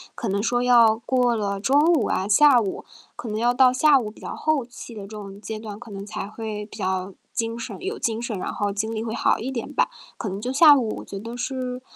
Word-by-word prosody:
可 230 - -4
能 200 +1 0
说 245 +2 +1
要 235 -3 +6
过 250 -2 +2
了 200 -2 -2
中 270 +7 +3
午 255 -10 +2
啊， 190 - -1
下 255 +4 +6
午 200 -4 -4 0.3
可 230 - -7
能 210 - -3
要 240 +2 +2
到 255 0 +5
下 280 +1 +5
午 215 -3 -4
比 215 - -16
较 - - -6
后 310 -6 0
期 240 -1 -11
的 205 - -7
这 195 - -9
种 200 -2 -9
阶 220 0 -6
段， 215 -1 -8
可 230 -3 -11
能 195 0 -6
才 210 - -5
会 215 -1 -6
比 210 - -12
较 190 -1 -2 0.2
精 230 0 -2
神 230 - -6
有 400 +4 -4
精 225 0 -2
神， 235 -5 -3
然 - - -4
后 205 -1 -1
精 220 +3 -2
力 220 0 -3
会 225 -1 -4
好 - - +2
一 245 +4 -4
点 245 -3 -5
吧， - - +2 0.3
可 215 - -4
能 195 +2 -5
就 250 +4 -3
下 295 +1 +8
午 235 -6 -2
觉 200 - -8
得 230 +3 -7
是 250 0 -4
225 Hz, 270 characters per minute, -24 LUFS, 210-250 Hz, 0.3 s, 下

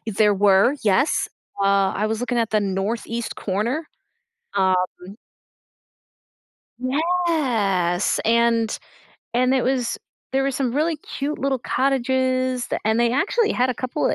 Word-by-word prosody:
There 210 -1 +2
were, 200 +5 +4
yes. 215 +9 +2 0.3
Uh, 195 -1 +3
I 210 +2 0
was 220 +1 -2
looking 245 -1 -1
at 230 -2 0
the 215 - +2
North 200 +3 -2
East 230 0 -4
corner. 235 - -2 0.7
Um 190 -1 +3 2.0
Yes, 255 - 0
and 230 -1 +2 0.6
and 255 +2 +3
it 260 - +2
was 255 -2 0 0.3
there 270 0 +2
were 275 - +1
some 255 -2 -2
really 315 +3 +1
cute 290 0 -5
little 270 -1 0
cottages, 255 -1 0
th - - -2
and 220 +2 +2
they 235 0 +2
actually 415 - +1
had 250 +1 +1
a - - -2
couple 255 +5 -2
of - - +1
245 Hz, 140 wpm, -22 LUFS, 215-270 Hz, 2.0 s, were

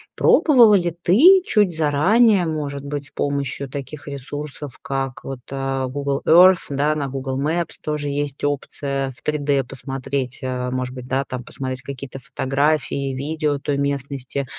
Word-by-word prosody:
пробовала 240 -9 +6
ли 175 -3 +1
ты 325 - +7
чуть 205 -6 +2
заранее, 180 +7 +4
может 145 -3 -3
быть, 140 0 -5
с - - -23
помощью 140 -1 -2
таких 140 +2 -7
ресурсов, 145 0 -7
как 135 -2 -4
вот, 135 -2 -6
а, 135 -1 -2
Google 140 +1 -2
Earth, 180 +2 +7
да, 145 +2 +1
на 145 -2 -2
Google 135 0 -3
Maps 165 +4 -1
тоже 150 -1 -3
есть 145 -1 -3
опция 140 -1 -2
в 125 - -19
3D 145 -2 0
посмотреть, 135 0 -4
а, 125 -1 -2
может 130 0 -3
быть, 125 -1 -8
да, 135 +1 0
там 125 -2 -6
посмотреть 130 +1 -5
какие-то 135 0 -7
фотографии, 135 +2 -1
видео 150 +1 -1
той 140 0 -2
местности, 140 -1 -2
140 Hz, 150 wpm, -21 LUFS, 135-150 Hz, -, ты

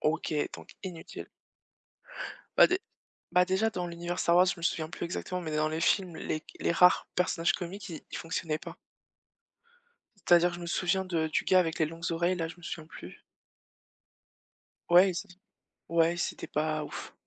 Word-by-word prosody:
OK, 155 -1 0
donc - - -11
inutile. 175 -4 -7 1.3
Bah - - +10
dé 365 +1 0 0.5
bah 180 0 +5
déjà, 190 +4 +1
dans 180 -4 -3
l'univers 175 +1 -4
Star 170 - +3
Wars, 180 +1 +7
je 185 - +1
me 170 - -12
souviens 160 -2 0
plus - - -5
exactement, 180 +1 -3
mais 160 -3 -4
dans 155 0 +2
les 160 +1 -3
films, 180 0 +1
les 155 -1 -3 0.2
les - - +2
rares 180 +1 +5
personnages 175 -1 +2
comiques 185 +3 -6
ils 160 - -7
ils - - -4
fonctionnaient 165 -2 -2
pas. - - -9 1.5
C'est-à-dire, 175 0 +5
je 175 - -7
me 170 - -6
souviens 180 +2 +1
de 165 -4 0
du 155 - 0
gars 185 -1 +5
avec 160 -2 -1
les 160 - +3
longues 165 +1 -5
oreilles 170 +2 +1
là, 165 -2 -2
je 165 - -10
me 175 - -18
souviens 160 -2 -6
plus. 90 - -11 1.7
Ouais 180 +2 +7
et - - -5
c 170 - -4 0.6
ouais, 165 0 +3
et - - -7
c'était - - -3
pas 155 0 -1
ouf, - - -8
170 Hz, 185 wpm, -30 LUFS, 160-180 Hz, 1.7 s, Bah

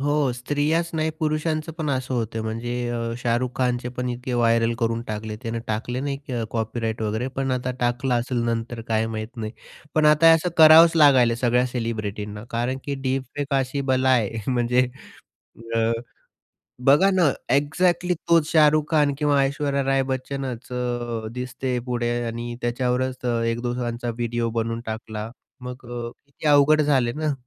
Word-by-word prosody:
हो, 145 -2 +1
स्त्रियाच 145 +7 0
नाही, 160 0 0
पुरुषांचं 155 0 -1
पण 155 - -2
असं 130 -1 -2
होतं 115 -1 -2
म्हणजे 115 +2 -4 0.2
अ, 120 - -2 0.2
शाहरुख 120 +1 0
खानचे 125 -1 0
पण 125 0 -2
इतके 125 +1 -4
व्हायरल 115 -1 +3
करून 115 -1 0
टाकले. 110 0 -4
त्याने 115 0 -3
टाकले 120 +3 -3
नाही 140 -4 -3
कॉपीराईट 115 0 -2
वगैरे, 110 +4 -1
पण 135 0 -3
आता 125 0 -1
टाकला 125 +2 0
असेल 120 +1 -1
नंतर 115 0 -2
काय 110 0 +1
माहीत 110 +2 -6
नाही. 110 -1 -5 0.4
पण 155 -1 +4
आता 155 +2 +6
असं 165 +2 0
करावंच 160 +1 +8
लागायला 130 -6 +6
सगळ्या 125 0 +2
सेलिब्रिटींना, 105 -4 -4
कारण 120 +3 -1
की 140 - -2
डीप 135 0 -1
फेक 145 - -2
एक - - +3
अशी 135 +1 -2
बला 130 0 +2
आहे 115 -3 +1
म्हणजे 125 +1 +2 0.9
अ, 115 0 +2 0.9
बघा 150 +9 +5
ना, 180 -7 +3 0.2
एक्झॅक्टली 175 +5 +1
तोच 165 -2 +4
शाहरुख 155 -1 +5
खान 150 -3 +3
किंवा 145 -2 +2
ऐश्वर्या 140 0 0
राय 135 0 +2
बच्चनच 130 -2 -4
अ, 120 -2 -3
दिसते 125 +1 -3
पुढे, 120 -1 -1 0.2
आणि 120 +1 -4
त्याच्यावरच 125 +1 0
अ, 120 -1 +1
एक 115 0 -1
दोघांचा 120 -1 -3
व्हिडिओ 120 0 -2
बनवून 115 +1 -3
टाकला 110 0 -5 0.3
मग 125 0 -8
अ, 120 -1 -4 0.2
किती 140 +2 -8
अवघड 150 +1 +5
झाले 130 -5 +2
ना 155 0 -1
125 Hz, 160 wpm, -23 LUFS, 115-140 Hz, 0.9 s, करावंच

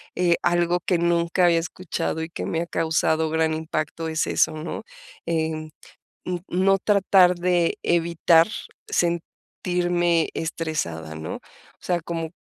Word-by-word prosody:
eh, 175 -1 +3
algo 175 0 +2
que 180 +1 0
nunca 170 +1 +2
había 170 -1 +4
escuchado 165 -1 -3
y 160 - -6
que 170 - -5
me 165 - -1
ha - - -2
causado 160 -1 +1
gran 160 0 +1
impacto 160 0 -3
es 160 0 0
eso, - - +2
¿no?, 155 +1 -5 0.4
eh, 160 -1 -2 0.6
mm, 180 0 -2
no 190 +2 +3
tratar 190 -3 +4
de 175 -1 +1
evitar 170 -1 +3 0.4
sentirme 175 0 0
estresada, 155 - -3
¿no?, 80 0 -5
o - - -8 0.4
sea, 175 -1 -1
como, 165 0 -4
170 Hz, 135 wpm, -24 LUFS, 160-175 Hz, 0.6 s, había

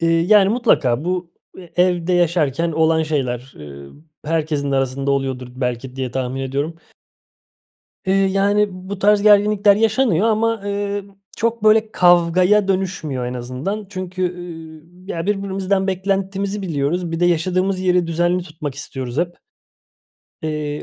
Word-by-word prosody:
Eee, 165 - +1
yani, 195 +2 +5
mutlaka 165 - +2
bu 180 -1 -2 0.3
e 180 0 -1
evde 180 -1 0
yaşarken 170 -2 +1
olan 160 0 +2
şeyler, 130 -4 -2
eee, 70 -1 -10 0.4
herkesin 150 -3 -1
de - - +2
arasında 135 +1 -1
oluyordur 130 -2 -2
belki 125 0 -3
diye 130 -2 -3
tahmin 130 +1 -3
ediyorum. 140 +5 -2 1.3
Eee, 190 - +2
yani, 200 +2 +2
bu 185 +2 -7
tarz 205 0 +3
gerginlikler 205 -1 +5
yaşanıyor 220 -3 +2
ama, 225 -1 +1
eee, 200 0 -2 0.3
çok, 230 -1 -1
böyle, 215 0 +4
kavgaya 180 +3 +4
dönüşmüyor 175 -9 -2
en 125 - -4
azından. 130 - -4
Çünkü, 185 -1 -5
ııı, 170 +1 -11
ya, 165 +2 -3
birbirimizden 195 -1 -1
beklentimizi 195 +1 -2
biliyoruz. 165 +1 -1
Bir 165 - -3
de 175 - +4
yaşadığımız 185 +3 +1
yeri 180 -2 +2
düzenli 175 +2 0
tutmak 155 -5 -7
istiyoruz 130 -2 -6
hep. 175 0 -2 1.0
Eee, 150 -1 -3
175 Hz, 135 wpm, -20 LUFS, 145-195 Hz, 1.3 s, yani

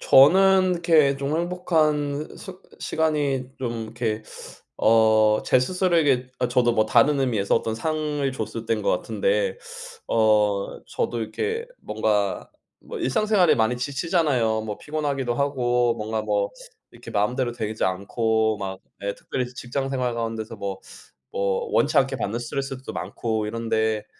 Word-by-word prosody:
저는 185 +6 +6
이렇게 160 -5 +3
좀 140 +2 -2
행복한 155 -4 0
스 190 -2 -10 0.2
시간이 145 -5 -1
좀 115 -3 -3
이렇게 110 -1 -3 0.5
어 110 -1 +4
제 - - +4
스스로에게 155 -6 +1
어 125 - +1
저도 120 -1 +3
뭐 110 -2 +3
다른 135 +6 +4
의미에서 115 -7 +1
어떤 110 -1 0
상을 150 +1 -1
줬을 130 - -5
때인 - - 0
것 - - +1
같은데 - - 0 0.5
어 105 -3 +2
저도 120 - -2
이렇게 445 - -3
뭔가 105 -2 -1 0.3
뭐 - - -8
일상생활에 200 +7 +3
많이 115 +2 +1
지치잖아요. 135 - 0
뭐 105 -1 -5
피곤하기도 145 -5 -2
하고 125 -3 +1
뭔가 110 +1 -3
뭐 105 -1 0 0.4
이렇게 - - -11
마음대로 120 +4 0
되지 110 -2 -3
않고 110 +3 0
막 95 -1 -5 0.2
예 100 0 -2
특별히 125 -1 -4
직장 125 +2 -4
생활 125 -3 -1
가운데서 115 -1 -4
뭐 100 -1 -5 0.5
뭐 100 -1 -1
원치 - - +2
않게 - - +3
받는 115 +4 -3
스트레스들도 135 +2 -5
많고 110 -2 -3
이런데 110 -1 -1
125 Hz, 300 characters per minute, -24 LUFS, 110-150 Hz, 0.5 s, 저는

